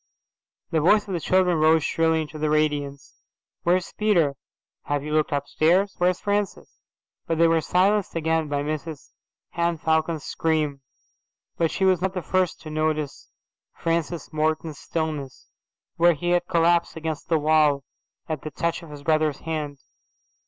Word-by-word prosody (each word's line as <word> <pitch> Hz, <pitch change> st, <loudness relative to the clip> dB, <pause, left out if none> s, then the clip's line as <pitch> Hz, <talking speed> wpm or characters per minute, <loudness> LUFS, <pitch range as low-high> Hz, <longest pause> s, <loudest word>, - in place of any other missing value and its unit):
The 160 Hz, -, +2 dB
voice 205 Hz, +6 st, +4 dB
of 195 Hz, -, -4 dB
the 175 Hz, -, -1 dB
children 180 Hz, 0 st, +2 dB
rose 160 Hz, 0 st, +4 dB
shrilly 160 Hz, 0 st, +1 dB
into 155 Hz, 0 st, -9 dB
the 155 Hz, 0 st, 0 dB
radiance. 145 Hz, -2 st, -1 dB, 0.4 s
"Where's 180 Hz, +2 st, +1 dB
Peter?"' 180 Hz, -10 st, +2 dB, 0.5 s
"Have 145 Hz, -1 st, -1 dB
you 150 Hz, 0 st, -4 dB
looked 155 Hz, -1 st, +1 dB
upstairs?"' 160 Hz, +7 st, +2 dB
"Where's 180 Hz, 0 st, +2 dB
Francis?"' 205 Hz, -1 st, -2 dB, 0.5 s
but 165 Hz, -, 0 dB
they 165 Hz, +1 st, +5 dB
were 165 Hz, 0 st, +3 dB
silenced 195 Hz, +4 st, +1 dB
again 160 Hz, -1 st, 0 dB
by 145 Hz, -1 st, -1 dB
Mrs 155 Hz, 0 st, -5 dB, 0.4 s
Henne 170 Hz, 0 st, 0 dB
Falcon's 160 Hz, 0 st, 0 dB
scream. 155 Hz, -4 st, -1 dB, 0.7 s
But 165 Hz, -1 st, +1 dB
she 190 Hz, -, 0 dB
was 185 Hz, -2 st, +3 dB
not 190 Hz, 0 st, -1 dB
the 180 Hz, -, -3 dB
first 185 Hz, -2 st, 0 dB
to 155 Hz, -, -8 dB
notice 155 Hz, -2 st, -2 dB, 0.5 s
Francis 165 Hz, 0 st, -2 dB
Morton's 155 Hz, -1 st, -1 dB
stillness, 155 Hz, -5 st, -4 dB, 0.5 s
where 175 Hz, +1 st, +5 dB
he 175 Hz, +3 st, -2 dB
had 175 Hz, 0 st, +1 dB
collapsed 170 Hz, -1 st, +2 dB
against 160 Hz, -2 st, -5 dB
the 165 Hz, -, +3 dB
wall 150 Hz, -2 st, +3 dB, 0.4 s
at 155 Hz, -4 st, -3 dB
the 155 Hz, -, -5 dB
touch 170 Hz, +4 st, -2 dB
of 165 Hz, -, -12 dB
his 145 Hz, -1 st, -10 dB
brother's 155 Hz, -1 st, +1 dB
hand. 155 Hz, -3 st, -4 dB
160 Hz, 155 wpm, -24 LUFS, 150-175 Hz, 0.7 s, they